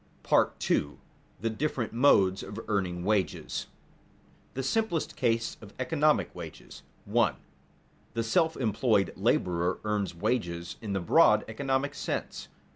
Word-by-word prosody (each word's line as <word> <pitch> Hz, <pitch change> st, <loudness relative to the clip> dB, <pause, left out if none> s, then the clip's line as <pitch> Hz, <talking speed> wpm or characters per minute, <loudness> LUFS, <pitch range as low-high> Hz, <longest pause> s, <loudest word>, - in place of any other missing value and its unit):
§ -, -, +2 dB
II. 75 Hz, 0 st, +1 dB, 0.4 s
THE 115 Hz, +1 st, 0 dB
DIFFERENT 120 Hz, -1 st, -2 dB
MODES 100 Hz, -7 st, +4 dB
OF 105 Hz, +2 st, -7 dB
EARNING 90 Hz, -4 st, -1 dB
WAGES 105 Hz, -2 st, 0 dB
[Sidenote: -, -, -11 dB
The 135 Hz, -, -2 dB
simplest 175 Hz, -, 0 dB
case 115 Hz, 0 st, 0 dB
of 105 Hz, -2 st, -13 dB
economic 150 Hz, +3 st, +1 dB
wages] -, -, -10 dB, 0.2 s
1. 105 Hz, -, +2 dB, 0.8 s
_The 115 Hz, -, 0 dB
self 160 Hz, +8 st, +2 dB
employed 110 Hz, -3 st, +1 dB
laborer 90 Hz, 0 st, +1 dB
earns 105 Hz, -4 st, -1 dB
wages 85 Hz, -3 st, -2 dB
in 105 Hz, -3 st, -4 dB
the 95 Hz, -, -1 dB
broad 85 Hz, -, +5 dB
economic 135 Hz, 0 st, -1 dB
sense. -, -, -4 dB
110 Hz, 125 wpm, -29 LUFS, 95-130 Hz, 0.8 s, broad